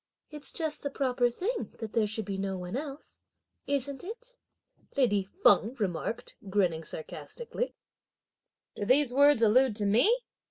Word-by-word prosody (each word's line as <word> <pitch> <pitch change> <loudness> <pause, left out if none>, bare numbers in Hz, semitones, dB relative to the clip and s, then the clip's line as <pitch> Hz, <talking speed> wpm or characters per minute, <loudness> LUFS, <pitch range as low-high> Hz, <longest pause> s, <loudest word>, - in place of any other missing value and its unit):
"It's 300 -1 -6
just 315 -2 -3
the 285 - -2
proper 255 -3 +1
thing 425 - -3
that 220 -2 -6
there 220 -2 +2
should 215 0 -4
be 195 0 -4
no 195 -1 -2
one 180 +3 -5
else! 280 +1 -7 0.5
Isn't 280 -1 -2
it?" 485 +6 -9 0.6
lady 205 -8 +2
Feng 230 +5 +5
remarked 205 0 -3
grinning 180 -5 +1
sarcastically. 475 - -6 1.0
"Do 205 - -4
these 255 +2 +4
words 285 -3 +5
allude 235 +2 +5
to 210 -1 -1
me?" 320 - +4
245 Hz, 145 wpm, -29 LUFS, 205-290 Hz, 1.0 s, Feng